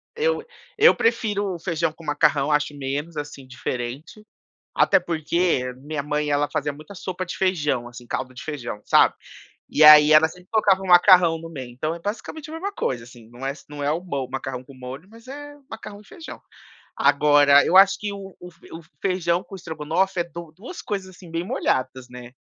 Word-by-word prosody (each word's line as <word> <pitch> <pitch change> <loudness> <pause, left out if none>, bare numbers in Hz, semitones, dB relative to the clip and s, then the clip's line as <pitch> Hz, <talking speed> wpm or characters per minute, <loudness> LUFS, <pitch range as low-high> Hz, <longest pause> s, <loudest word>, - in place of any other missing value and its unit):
eu 470 0 0 0.3
eu 460 +3 +6
prefiro 205 -5 0
feijão 165 -2 -1
com 165 +1 -16
macarrão, 145 -1 +2
acho 150 0 0
menos, 145 +4 -4
assim, 145 -2 -7
diferente, 130 - -6 0.5
até - - +4
porque 170 -3 0
a - - -12
minha 145 +2 -5
mãe, 150 +1 -2
ela 145 0 +1
fazia 145 0 -2
muita 155 +7 -13
sopa 185 0 -5
de 175 - -7
feijão, 150 -10 0
assim, 120 0 -12
caldo 130 +1 -4
de 125 - -10
feijão, 135 -9 -6
sabe. - - +4 0.5
E 155 - +3
aí, 150 0 +9
ela 155 +1 +7
sempre 180 +3 -16
colocava 200 -4 +3
um - - -6
macarrão 175 -2 +6
no 165 0 -9
meio, 135 -6 -8
então, 155 +7 -3
é - - -10
basicamente 230 - -6
a - - -8
mesma 375 +5 -4
coisa, 125 - -3
assim, 120 -2 -16
não 125 +2 -9
é 135 - -1
se - - -16
não 145 -1 -6
é 145 - +1
o 165 +3 -2
mo 140 -8 -4
macarrão 130 -1 -5
com 135 - -15
molho, 130 +6 -9
mas 230 +2 -17
é 290 +2 -9
macarrão 215 -2 -9
e - - -21
feijão. 330 - -11 0.6
Agora 145 0 +5
eu 185 - +2
acho 195 0 +7
que 210 -1 -4
o 195 -2 -10
o 180 - -10
f 165 - -26
o 165 - -8 0.2
feijão 180 -2 0
com - - -12
estrogonofe 170 +2 -2
é - - 0
du 170 -2 -10
2 255 - -9
coisas 195 -2 -4
assim 180 -2 -14
bem 165 +1 -3
molhadas, 130 -7 -2
né. 125 -1 -11
160 Hz, 205 wpm, -23 LUFS, 140-190 Hz, 0.6 s, aí